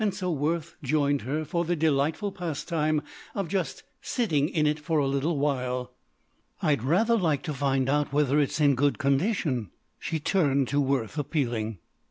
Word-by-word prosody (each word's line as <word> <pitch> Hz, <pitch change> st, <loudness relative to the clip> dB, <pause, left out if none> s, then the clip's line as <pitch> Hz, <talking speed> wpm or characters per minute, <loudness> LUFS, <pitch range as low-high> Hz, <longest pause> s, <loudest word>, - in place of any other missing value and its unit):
So 185 Hz, -2 st, -3 dB
Worth 160 Hz, +2 st, -2 dB
joined 145 Hz, 0 st, +1 dB
her 150 Hz, +6 st, -2 dB
for 170 Hz, +2 st, -1 dB
the 175 Hz, +1 st, 0 dB
delightful 155 Hz, +6 st, +1 dB
pastime 155 Hz, -3 st, -1 dB, 0.3 s
of 195 Hz, -3 st, -1 dB
just 180 Hz, -7 st, -2 dB, 0.2 s
sitting 155 Hz, -, 0 dB
in 155 Hz, -2 st, +1 dB
it 150 Hz, +1 st, +1 dB
for 155 Hz, +2 st, -1 dB
a 145 Hz, -, +3 dB
little 140 Hz, +4 st, 0 dB
while. 125 Hz, -3 st, -1 dB, 0.7 s
"I'd 145 Hz, -6 st, +1 dB
rather 195 Hz, -, +3 dB
like 160 Hz, -10 st, +1 dB
to 155 Hz, -4 st, -3 dB
find 135 Hz, -1 st, +1 dB
out 145 Hz, +1 st, +1 dB
whether 145 Hz, 0 st, +2 dB
it's 145 Hz, +2 st, 0 dB
in 145 Hz, -2 st, +5 dB
good 140 Hz, +2 st, +2 dB
condition." 140 Hz, -, 0 dB, 0.3 s
She 160 Hz, -, -2 dB
turned 145 Hz, -6 st, +2 dB
to 145 Hz, +1 st, +2 dB
Worth 135 Hz, -1 st, -1 dB
appealing. 120 Hz, -8 st, -1 dB
150 Hz, 165 wpm, -27 LUFS, 135-165 Hz, 0.7 s, in